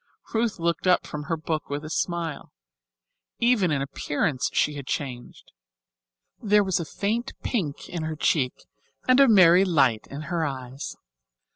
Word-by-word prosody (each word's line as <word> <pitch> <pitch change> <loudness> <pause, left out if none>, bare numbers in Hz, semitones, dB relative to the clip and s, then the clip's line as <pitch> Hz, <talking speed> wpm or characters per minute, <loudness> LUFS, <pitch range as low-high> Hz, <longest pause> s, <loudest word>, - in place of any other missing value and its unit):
Ruth 225 -1 0
looked 170 +1 -1
up 180 - +4
from 150 -1 -6
her 165 +2 -1
book 155 -1 -3
with 145 +2 -4
a - - -6
smile. 170 -4 -3 0.9
Even 235 -6 +3
in 140 -3 0
appearance 145 +1 -1
she 150 - +1
had 140 -2 -8
changed. 125 -4 -5 0.9
There 210 -1 +4
was 190 -3 0
a 170 - -3
faint 225 - -2
pink 170 - -2
in 170 - -5
her 155 0 -3
cheeks 140 -4 0 0.4
and 255 +1 +5
a 275 - +7
merry 185 -4 +7
light 135 - +2
in 140 +2 -6
her 165 +1 -2
eyes. 135 -2 -5
165 Hz, 155 wpm, -25 LUFS, 145-190 Hz, 0.9 s, a